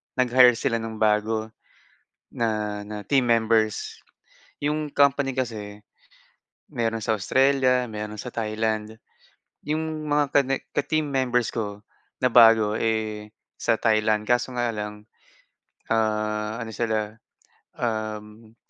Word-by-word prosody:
nag-hire 125 -1 +5
sila 115 0 -1
ng 110 0 -6
bago 110 +1 +1 0.9
na, 105 -3 -2
na 105 +1 -7
team 135 -3 +2
members. 110 -2 +1 0.6
Yung 150 0 -1
company 140 -2 +2
kasi 105 -5 -4 0.9
mayro'n 115 -1 -1
sa 110 - 0
Australia, 130 +3 +2
mayro'n 105 0 -6
sa 125 - -6
Thailand, 110 0 -2 0.7
yung 155 0 -3
mga 145 0 +3
ka - - +5
ne 135 +1 0 0.2
ka - - +2
team 155 -1 -1
members 125 -3 +1
ko 105 -3 -4 0.4
na - - +6
bago, 115 -3 +6
eh, 110 -2 -2 0.3
sa 115 - +2
Thailand 110 -1 +2
kaso 120 +1 +1
nga 120 0 0
lang, 105 0 -6 0.9
ah, 105 0 -1
ano 110 -1 -6
sila, 110 -2 -1 0.6
um 110 -1 -4
110 Hz, 120 wpm, -24 LUFS, 105-125 Hz, 0.9 s, na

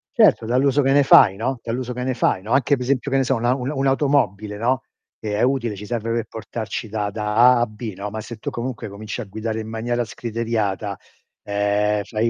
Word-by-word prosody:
Certo, 110 - +4
dall'uso 135 +4 +3
che 135 -1 +2
ne 145 0 +5
fai, 95 -7 +7
no 120 +5 -2
dall'uso 125 +2 -3
che 125 +1 -4
ne 130 0 0
fai, 95 -5 +1
no, 105 +4 -8
anche 135 +2 +3
pe 130 - -8
esempio, 135 +2 0
che 135 - +3
ne 135 - +3
so, 130 +1 +1
un'a 120 +1 +1
un 130 0 -3
un'automobile, 135 -7 +1
no, 125 +4 +1 0.4
che 105 -1 -3
è - - 0
utile, 125 -4 +1
ci 100 +2 -8
serve 115 0 -3
per 115 -1 -1
portarci 110 0 -5
da 105 -1 -2
da 105 0 -3
A 125 +2 +6
a - - +3
B, 110 0 -7
no, 100 +2 -5
ma 110 +2 -5
se 110 +2 -8
tu - - -4
comunque 120 -2 -5
cominci 105 +4 -6
a - - -6
guidare 110 +2 -4
in 110 - -6
maniera 120 +2 -1
scriteriata, 110 -4 -2 0.5
ehm, 105 +1 +1
fai 110 +2 0
115 Hz, 225 wpm, -22 LUFS, 105-125 Hz, 0.5 s, fai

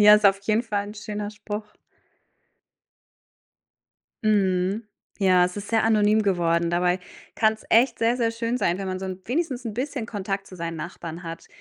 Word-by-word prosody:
Ja, 210 0 +9
ist 210 -1 +5
auf 195 0 +3
jeden 215 +3 +1
Fall 205 -3 -2
'n 210 - -9
schöner 210 -1 -5
Spruch. 210 0 -7 2.5
Mhm. 195 0 +2 0.4
Ja, 185 -2 +5
es 180 +2 -3
ist 205 0 -6
sehr 225 -1 +2
anonym 215 -1 +4
geworden, 170 -3 +1
dabei 180 +1 +1 0.3
kann's 220 -1 +1
echt 235 +1 +4
sehr, 230 +2 +2
sehr 230 -2 +1
schön 230 +1 -2
sein, 175 -6 +1
wenn 195 - -4
man 185 0 -2
so 190 - -4
'n 185 0 -5
wenigstens 260 -1 -2
'n 220 -3 -4
bisschen 255 -1 -3
Kontakt 195 -2 -3
zu 185 - -11
seinen 165 -1 -4
Nachbarn 170 0 -7
hat. 165 0 -7
205 Hz, 175 wpm, -25 LUFS, 185-225 Hz, 2.5 s, Ja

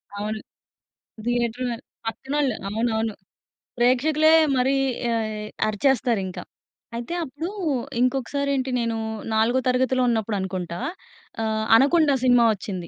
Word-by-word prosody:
అవును. 215 +1 -3 0.9
థియేటర్ 240 0 0
వె 235 - -2 0.3
పక్కనోళ్ళు. 270 +2 -1
అవునవును. 220 0 -1 0.6
ప్రేక్షకులే 295 +6 +4 0.3
మరీ 260 +2 +2 0.3
యాయ్ 220 -2 -1 0.3
అరిచేస్తారింక. 215 -4 0 0.6
అయితే, 235 +8 -4
అప్పుడూ 315 +4 -5 0.5
ఇంకొకసారేంటి, 270 +1 0
నేనూ 230 -1 -1 0.4
నాలుగో 225 +4 +3
తరగతిలో 255 0 +2
ఉన్నప్పుడనుకుంటా. 190 -6 -2 0.6
ఆహ్, 220 0 -1
'అనకొండా' 285 +3 +4
సినిమా 245 -2 +5
వచ్చింది. 185 -4 -6
240 Hz, 95 wpm, -24 LUFS, 220-265 Hz, 0.9 s, సినిమా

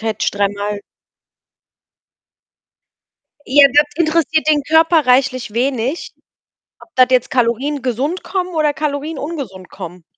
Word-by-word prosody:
hätte 220 -1 -2
ich - - +1
dreimal 205 0 -2 2.7
Ja, 280 +2 +6
das 295 +1 +5
interessiert 315 -1 +1
den 295 -2 +3
Körper 320 -1 +3
reichlich 255 -3 +1
wenig, 260 +4 -2 0.7
ob - - -17
das 255 -1 +5
jetzt 255 -1 +1
Kalorien 255 +3 0
gesund 265 +8 -2
kommen 365 -2 -3
oder 305 -2 +1
Kalorien 300 0 -3
ungesund 265 - -7
kommen. 175 0 -10
275 Hz, 120 wpm, -17 LUFS, 235-310 Hz, 2.7 s, Ja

